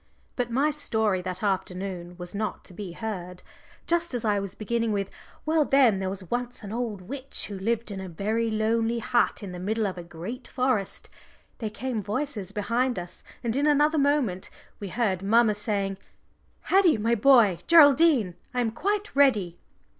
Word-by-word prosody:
But 245 Hz, -2 st, -1 dB
my 275 Hz, +6 st, +2 dB
story 220 Hz, -10 st, 0 dB
that 185 Hz, +2 st, -5 dB
afternoon 185 Hz, -2 st, -3 dB
was 175 Hz, +1 st, -8 dB
not 215 Hz, +1 st, -3 dB
to 185 Hz, -, -13 dB
be 185 Hz, -2 st, -7 dB
heard. 180 Hz, -3 st, -6 dB, 0.4 s
Just 340 Hz, -4 st, 0 dB
as 235 Hz, -, -3 dB
I 205 Hz, -2 st, +2 dB
was 195 Hz, 0 st, -5 dB
beginning 230 Hz, +1 st, -1 dB
with, 195 Hz, -1 st, -2 dB, 0.3 s
"Well, 315 Hz, 0 st, +3 dB
then, 260 Hz, -8 st, +4 dB
there 190 Hz, -1 st, -2 dB
was 190 Hz, -2 st, -7 dB
once 245 Hz, -1 st, -3 dB
an 205 Hz, +1 st, -6 dB
old 225 Hz, -5 st, -3 dB
witch 265 Hz, +8 st, -2 dB
who 200 Hz, -2 st, -7 dB
lived 230 Hz, +2 st, -1 dB
in 195 Hz, -1 st, -5 dB
a 190 Hz, -, -7 dB
very 215 Hz, +7 st, -1 dB
lonely 225 Hz, +2 st, +1 dB
hut 235 Hz, -1 st, +1 dB
in 195 Hz, -, -6 dB
the 180 Hz, -, -7 dB
middle 215 Hz, +4 st, -1 dB
of 185 Hz, -2 st, -3 dB
a -, -, -7 dB
great 180 Hz, +10 st, -8 dB
forest," 250 Hz, -6 st, -1 dB, 0.5 s
there 220 Hz, -3 st, -3 dB
came 230 Hz, +1 st, -3 dB
voices 210 Hz, -2 st, -3 dB
behind 235 Hz, +5 st, 0 dB
us, 175 Hz, 0 st, -8 dB, 0.2 s
and 230 Hz, -1 st, -1 dB
in 285 Hz, +2 st, +2 dB
another 300 Hz, +1 st, +3 dB
moment 275 Hz, -10 st, +1 dB, 0.3 s
we 200 Hz, -, -5 dB
heard 195 Hz, -3 st, -1 dB
mamma 220 Hz, +2 st, +4 dB
saying, 200 Hz, -2 st, -2 dB, 0.6 s
"Haddie, 375 Hz, -, +4 dB
my 225 Hz, +2 st, +1 dB
boy, 230 Hz, -6 st, +5 dB
Geraldine, 290 Hz, -, +6 dB, 0.2 s
I 250 Hz, -, +2 dB
am 230 Hz, -2 st, 0 dB
quite 410 Hz, -, -2 dB
ready." 210 Hz, -12 st, +3 dB
220 Hz, 175 wpm, -26 LUFS, 195-255 Hz, 0.6 s, Geraldine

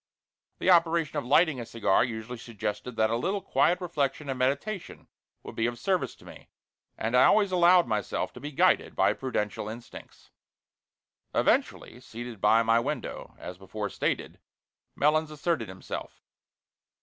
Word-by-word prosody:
The -, -, +3 dB
operation 165 Hz, -3 st, +3 dB
of 130 Hz, -, -7 dB
lighting 150 Hz, 0 st, +4 dB
a 120 Hz, -, -5 dB
cigar 115 Hz, -4 st, +2 dB
usually 115 Hz, 0 st, -5 dB
suggested 115 Hz, +2 st, -5 dB
that 110 Hz, 0 st, +2 dB
a -, -, +1 dB
little 190 Hz, +12 st, -1 dB
quiet 180 Hz, -2 st, +2 dB
reflection 145 Hz, -5 st, -2 dB
and 130 Hz, -, -5 dB
meditation 140 Hz, +10 st, -2 dB, 0.4 s
would -, -, -9 dB
be 115 Hz, -, +1 dB
of 120 Hz, 0 st, -4 dB
service 175 Hz, -, -1 dB
to -, -, -19 dB
me, -, -, -13 dB, 0.5 s
and 115 Hz, +3 st, -1 dB
I 125 Hz, -, +7 dB
always 205 Hz, -2 st, +4 dB
allowed 180 Hz, 0 st, +5 dB
myself 105 Hz, -3 st, -2 dB
to -, -, -10 dB
be 145 Hz, +1 st, -6 dB
guided 135 Hz, -, +2 dB
by -, -, +3 dB
prudential 105 Hz, -5 st, -3 dB
instincts. 115 Hz, +2 st, -11 dB, 1.0 s
Eventually, 120 Hz, -, +1 dB
seated 120 Hz, -3 st, -9 dB
by 110 Hz, +2 st, +5 dB
my 115 Hz, +1 st, +4 dB
window, 115 Hz, -, -5 dB
as 90 Hz, 0 st, -9 dB
before 105 Hz, +2 st, -5 dB
stated, -, -, -2 dB, 0.6 s
Melons 155 Hz, +2 st, +2 dB
asserted 155 Hz, -5 st, -2 dB
himself. 95 Hz, 0 st, -8 dB
125 Hz, 150 wpm, -28 LUFS, 115-160 Hz, 1.0 s, I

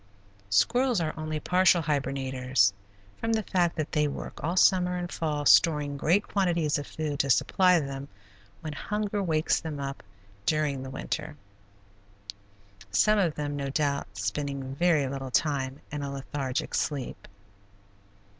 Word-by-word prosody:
Squirrels 235 Hz, -, +3 dB
are 160 Hz, -2 st, -1 dB
only 155 Hz, -1 st, -3 dB
partial 180 Hz, +1 st, +3 dB
hibernators, 130 Hz, -6 st, +1 dB, 0.5 s
from 225 Hz, 0 st, -1 dB
the 220 Hz, -1 st, +1 dB
fact 175 Hz, -3 st, +1 dB
that 155 Hz, -2 st, -3 dB
they 150 Hz, -1 st, +2 dB
work 140 Hz, -, -7 dB
all 170 Hz, +4 st, -1 dB
summer 180 Hz, -1 st, +4 dB
and 175 Hz, 0 st, -4 dB
fall 150 Hz, -2 st, -2 dB
storing 150 Hz, -3 st, +4 dB
great 175 Hz, +8 st, +2 dB
quantities 170 Hz, -7 st, +1 dB
of 145 Hz, -, -7 dB
food 150 Hz, -3 st, -4 dB
to 140 Hz, -, +1 dB
supply 180 Hz, +7 st, +4 dB
them 135 Hz, -1 st, -5 dB, 0.5 s
when 155 Hz, -, -5 dB
hunger 210 Hz, +5 st, -2 dB
wakes 160 Hz, -4 st, +1 dB
them 155 Hz, -3 st, -6 dB
up 140 Hz, 0 st, -5 dB, 0.5 s
during 150 Hz, -4 st, +1 dB
the 130 Hz, -, -6 dB
winter, -, -, -4 dB, 1.5 s
some 210 Hz, -, +3 dB
of 170 Hz, -6 st, +1 dB
them, 145 Hz, -1 st, -3 dB
no 140 Hz, -1 st, -3 dB
doubt, 140 Hz, 0 st, 0 dB
spending 135 Hz, +5 st, -3 dB
very 160 Hz, -1 st, +2 dB
little 135 Hz, 0 st, -5 dB
time 135 Hz, -1 st, 0 dB
in 145 Hz, 0 st, -4 dB
a 140 Hz, -, -3 dB
lethargic 135 Hz, -1 st, -3 dB
sleep. 140 Hz, -4 st, -3 dB
150 Hz, 145 wpm, -28 LUFS, 140-175 Hz, 1.5 s, summer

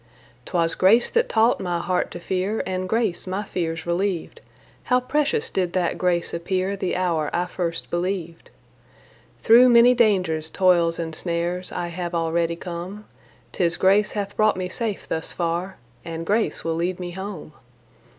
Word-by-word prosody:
'Twas 165 Hz, -2 st, +1 dB
grace 220 Hz, +6 st, +4 dB
that 470 Hz, 0 st, +1 dB
taught 225 Hz, +2 st, +3 dB
my 175 Hz, -2 st, -2 dB
heart 180 Hz, +1 st, -1 dB
to 175 Hz, -, -8 dB
fear, 190 Hz, +5 st, -2 dB
And 185 Hz, 0 st, -3 dB
grace 220 Hz, -6 st, 0 dB
my 190 Hz, +3 st, -2 dB
fears 165 Hz, -4 st, -3 dB
relieved. 185 Hz, -, -2 dB, 0.4 s
How 250 Hz, 0 st, +3 dB
precious 300 Hz, -, 0 dB
did 180 Hz, -2 st, -1 dB
that 180 Hz, -2 st, 0 dB
grace 175 Hz, -2 st, 0 dB
appear 185 Hz, +3 st, -1 dB
The 190 Hz, -2 st, -2 dB
hour 170 Hz, -4 st, 0 dB
I 175 Hz, +1 st, 0 dB
first 170 Hz, -2 st, -4 dB
believed. 175 Hz, -1 st, -3 dB, 0.9 s
Through 240 Hz, +3 st, +7 dB
many 240 Hz, +1 st, +7 dB
dangers, 185 Hz, -9 st, +1 dB
toils 170 Hz, -3 st, +3 dB
and 165 Hz, -1 st, -4 dB
snares 175 Hz, +2 st, -3 dB
I 175 Hz, -1 st, -3 dB
have 175 Hz, 0 st, -4 dB
already 165 Hz, 0 st, 0 dB
come; 180 Hz, +4 st, -7 dB, 0.5 s
'Tis 170 Hz, -2 st, 0 dB
grace 200 Hz, +3 st, +4 dB
hath 205 Hz, -1 st, -4 dB
brought 215 Hz, -3 st, +3 dB
me 185 Hz, -1 st, -2 dB
safe 220 Hz, 0 st, -3 dB
thus 160 Hz, -, -3 dB
far 175 Hz, +2 st, -2 dB, 0.3 s
And 165 Hz, 0 st, -6 dB
grace 215 Hz, +4 st, 0 dB
will 165 Hz, -, -1 dB
lead 175 Hz, +2 st, -2 dB
me 175 Hz, -1 st, -5 dB
home. 190 Hz, -4 st, -7 dB
180 Hz, 160 wpm, -23 LUFS, 170-200 Hz, 0.9 s, Through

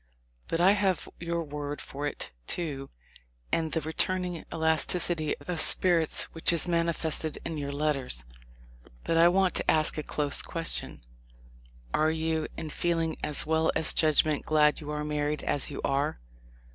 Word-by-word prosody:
But 165 Hz, -, -2 dB
I 180 Hz, +3 st, +6 dB
have 195 Hz, -3 st, 0 dB
your 170 Hz, 0 st, -2 dB
word 145 Hz, -1 st, -5 dB
for 145 Hz, +2 st, -5 dB
it, 145 Hz, -, -6 dB, 0.2 s
too, 145 Hz, -6 st, -3 dB, 0.6 s
and 160 Hz, -1 st, 0 dB
the 160 Hz, -, -1 dB
returning 180 Hz, +2 st, -1 dB
elasticity 160 Hz, 0 st, +1 dB
of 175 Hz, -2 st, -4 dB
spirits 170 Hz, -3 st, +4 dB
which 165 Hz, -, +4 dB
is 170 Hz, +1 st, +1 dB
manifested 165 Hz, -2 st, 0 dB
in 160 Hz, -2 st, -4 dB
your 140 Hz, -1 st, -4 dB
letters. 140 Hz, -, -2 dB, 0.8 s
But 165 Hz, -, 0 dB
I 165 Hz, +1 st, +7 dB
want 185 Hz, 0 st, +3 dB
to -, -, -1 dB
ask 155 Hz, 0 st, +3 dB
a -, -, -1 dB
close 145 Hz, 0 st, 0 dB
question: 165 Hz, -, -2 dB, 0.9 s
'Are 155 Hz, +1 st, +3 dB
you 160 Hz, 0 st, -1 dB
in 155 Hz, -, -5 dB
feeling 165 Hz, -1 st, -1 dB
as 150 Hz, -, 0 dB
well 160 Hz, +1 st, +2 dB
as 160 Hz, -, +3 dB
judgment 155 Hz, -1 st, +2 dB
glad 150 Hz, -1 st, +3 dB
you 150 Hz, -, -8 dB
are 150 Hz, 0 st, -3 dB
married 150 Hz, 0 st, -2 dB
as 145 Hz, -, 0 dB
you -, -, -7 dB
are?' 140 Hz, -, 0 dB
160 Hz, 155 wpm, -28 LUFS, 150-170 Hz, 0.9 s, I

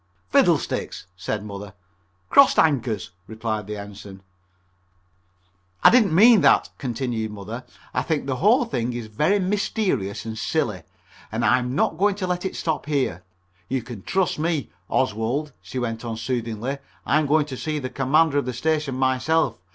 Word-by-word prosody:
"Fiddlesticks!" -, -, +1 dB
said 105 Hz, +3 st, -4 dB
Mother. 100 Hz, -1 st, -8 dB, 0.6 s
"Crossed 280 Hz, -, +6 dB
anchors," 120 Hz, -, +1 dB, 0.2 s
replied 110 Hz, -2 st, -4 dB
the 105 Hz, 0 st, -5 dB
Ensign. 100 Hz, -1 st, -10 dB, 1.6 s
"I -, -, +9 dB
didn't 220 Hz, -9 st, +4 dB
mean 220 Hz, +2 st, +7 dB
that," -, -, +4 dB
continued 120 Hz, -4 st, -2 dB
Mother, 105 Hz, +4 st, -7 dB, 0.3 s
"I -, -, +1 dB
think 155 Hz, -4 st, -1 dB
the 130 Hz, -2 st, -2 dB
whole 220 Hz, -, +4 dB
thing 125 Hz, -, -2 dB
is 120 Hz, -1 st, -5 dB
very 150 Hz, -, +1 dB
mysterious 185 Hz, -, -1 dB
and 110 Hz, -1 st, -5 dB
silly, -, -, -1 dB, 0.5 s
and -, -, -1 dB
I'm 125 Hz, +1 st, +2 dB
not 160 Hz, +2 st, +1 dB
going 200 Hz, 0 st, +3 dB
to 200 Hz, -2 st, -3 dB
let 180 Hz, 0 st, -2 dB
it 190 Hz, -, -3 dB
stop 160 Hz, -3 st, -2 dB
here. 135 Hz, -, 0 dB, 0.5 s
You 130 Hz, -2 st, -1 dB
can 115 Hz, -4 st, -8 dB
trust 185 Hz, -, 0 dB
me, 160 Hz, -5 st, -1 dB, 0.2 s
Oswald," 130 Hz, +5 st, 0 dB
she -, -, -8 dB
went 115 Hz, -2 st, -3 dB
on 115 Hz, -2 st, -4 dB
soothingly. 120 Hz, +2 st, -3 dB, 0.3 s
"I 150 Hz, -, +3 dB
am 155 Hz, -, 0 dB
going 150 Hz, +1 st, +3 dB
to 140 Hz, -3 st, -6 dB
see 155 Hz, +3 st, -3 dB
the 130 Hz, -3 st, -4 dB
Commander 145 Hz, +3 st, +3 dB
of 140 Hz, -, -3 dB
the 125 Hz, -, -3 dB
station 150 Hz, +1 st, -1 dB
myself. 130 Hz, -, +1 dB
130 Hz, 160 wpm, -23 LUFS, 110-160 Hz, 1.6 s, I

